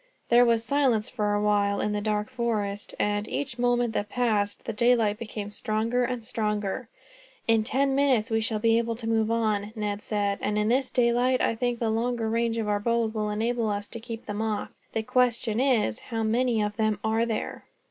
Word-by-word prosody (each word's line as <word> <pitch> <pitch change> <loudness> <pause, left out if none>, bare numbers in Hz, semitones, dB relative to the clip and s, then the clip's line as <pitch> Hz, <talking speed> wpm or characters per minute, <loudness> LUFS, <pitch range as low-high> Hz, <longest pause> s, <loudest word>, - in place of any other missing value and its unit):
There 240 +1 +6
was 230 -1 +2
silence 255 -5 +1
for 210 -4 0
a 205 - 0
while 205 -1 +2
in 210 - 0
the 210 0 -1
dark 210 0 -1
forest 215 -5 -2
and, 205 0 0
each 260 -4 -4
moment 245 -1 +2
that 205 -1 -2
passed, 210 -4 0
the 225 - -3
daylight 225 -2 +2
became 210 -2 -6
stronger 225 +4 0
and 245 -1 -3
stronger. 215 0 -2 0.6
"In 225 -1 +4
ten 270 +4 +1
minutes 260 -5 +2
we 225 0 +2
shall 220 0 -1
be 225 +1 +3
able 230 0 -2
to 225 0 -6
move 225 -1 +1
on," 215 -2 0
Ned 210 -1 -3
said; 205 -2 -1
"and 210 0 -1
in 210 +1 +1
the 260 +2 +2
daylight, 245 +1 +2
I - - +2
think 245 +1 -1
that 235 - -2
the 220 - +1
longer 230 0 -1
range 230 0 0
of 220 -2 -1
our 205 0 +1
bows 230 0 0
will 215 -1 -1
enable 225 +2 0
us 205 0 -2
to 230 - -7
keep 230 0 -7
them 210 0 -3
off. 220 -2 -2 0.2
The 225 - -1
question 235 -2 +1
is, 240 - +2
how 225 -2 -4
many 230 0 +1
of 210 0 -3
them 215 -1 +1
are 220 +1 +1
there?" 225 -2 -3
225 Hz, 210 wpm, -27 LUFS, 210-240 Hz, 0.6 s, There